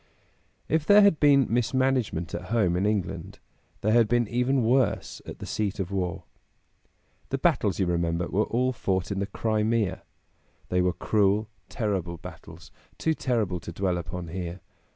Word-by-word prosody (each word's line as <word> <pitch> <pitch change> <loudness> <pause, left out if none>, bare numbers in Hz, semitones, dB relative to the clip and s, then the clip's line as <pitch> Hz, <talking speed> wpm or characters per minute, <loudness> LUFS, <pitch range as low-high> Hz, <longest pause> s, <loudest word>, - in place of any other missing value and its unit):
If 160 -1 +1
there 205 0 +8
had 200 -6 +4
been 140 -3 +5
mismanagement 120 -7 0
at - - -4
home 105 -7 +1
in 95 +3 +1
England, 105 -3 -2 0.4
there 110 +2 +2
had 115 -2 +5
been 120 0 +2
even 125 +3 +1
worse 125 +3 +1
at - - -7
the - - -8
seat 105 -1 -2
of 95 0 -3
war. 90 -3 -2 1.1
The - - -1
battles, - - +1
you 95 - +1
remember, 85 0 0
were 105 +3 +1
all 130 +2 0
fought 95 -4 -1
in 100 - -1
the 100 - -1
Crimea. 110 -1 0 0.7
They 90 0 +2
were 90 0 +1
cruel, 105 0 +1 0.2
terrible 95 -7 -2
battles, - - -12 0.3
too 160 - +1
terrible 110 - -1
to 85 +1 -8
dwell 90 0 -1
upon 85 0 -6
here. 90 0 -5
105 Hz, 160 wpm, -26 LUFS, 90-120 Hz, 1.1 s, there